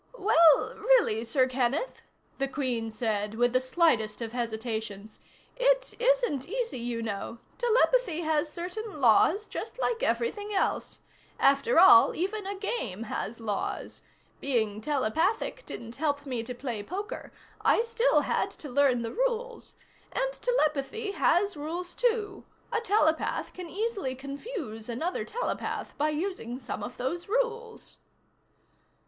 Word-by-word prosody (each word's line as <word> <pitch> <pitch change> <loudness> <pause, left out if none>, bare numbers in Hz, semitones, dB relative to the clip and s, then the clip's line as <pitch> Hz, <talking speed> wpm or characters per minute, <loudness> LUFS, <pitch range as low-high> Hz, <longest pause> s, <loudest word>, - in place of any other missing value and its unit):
"Well, 335 - +5
really, 435 - +3
Sir 255 +3 +2
Kenneth," 260 - -1 0.4
the 275 - +1
Queen 255 -5 -2
said 215 -2 -2
with 245 +1 +2
the 255 - +3
slightest 255 -7 +2
of 230 -2 -4
hesitations, 220 -3 -4 0.4
"it - - +2
isn't 485 - +1
easy, 465 - -2
you 235 -1 -3
know. 225 +1 -4 0.2
Telepathy 485 -6 +3
has 310 -1 0
certain 360 +2 -6
laws, 285 - +4
just - - -6
like 475 -2 -1
everything 240 - -1
else. 380 - -1 0.4
After 275 +3 +4
all, 345 -11 +8
even 390 +3 -2
a 400 - -3
game 320 - -3
has 225 0 -4
laws. 210 -3 -4 0.4
Being 220 -6 0
telepathic 310 - 0
didn't 230 0 -7
help 285 -1 -1
me 250 -4 -2
to 250 - -6
play 240 -4 -4
poker 400 - -6 0.3
I 455 - +4
still 470 +2 +2
had - - 0
to 295 - -9
learn 260 -3 +3
the 230 - -4
rules. - - -2 0.4
And - - -1
telepathy 425 - 0
has 400 0 +2
rules, 335 +5 -5
too. 440 -5 0 0.3
A - - 0
telepath 360 -8 +1
can 360 -2 -8
easily 400 - -2
confuse 275 - -6
another 315 +10 -2
telepath 475 +3 -3
by 300 +1 +2
using 305 -7 -3
some 260 - -6
of 245 - -6
those 340 +9 -3
rules." 470 -1 -2
310 Hz, 135 wpm, -28 LUFS, -, 0.4 s, all